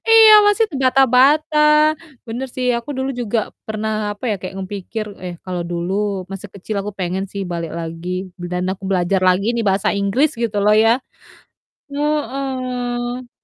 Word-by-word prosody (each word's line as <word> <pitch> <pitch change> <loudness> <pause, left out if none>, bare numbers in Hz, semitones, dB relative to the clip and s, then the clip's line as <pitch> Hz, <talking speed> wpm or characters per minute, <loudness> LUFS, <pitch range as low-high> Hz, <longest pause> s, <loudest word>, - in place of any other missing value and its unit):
Iya, 445 -1 +9
masih 415 +2 +4
terbata-bata, 270 +3 +3 0.7
bener 240 +4 -4
sih 255 - -1
aku 235 - -9
dulu 265 +1 -1
juga 230 0 -1 0.3
pernah, 220 0 -2 0.2
apa 205 +4 -11
ya, 210 - +1
kayak 185 +1 -6
nge 190 - -4
pikir, 215 +3 -5 0.2
"Eh, 175 -1 -5
kalau 180 -2 -3
dulu 175 +2 -2 0.4
masih 195 +1 -7
kecil 200 +2 -6
aku 205 - -4
pengen 185 +1 -2
sih 200 -1 -3
balik 170 -1 -4
lagi, 165 +1 -6 0.3
b - - -7
dan 180 0 -1
aku 195 +1 -10
belajar 185 0 +1
lagi 185 +3 +2
nih 235 - 0
bahasa 195 0 +1
Inggris," 200 +10 +2
gitu 220 -3 -1
loh 210 0 +5
ya. 225 - +6 1.0
Heeh. 255 -4 -2
220 Hz, 160 wpm, -19 LUFS, 190-260 Hz, 1.0 s, Iya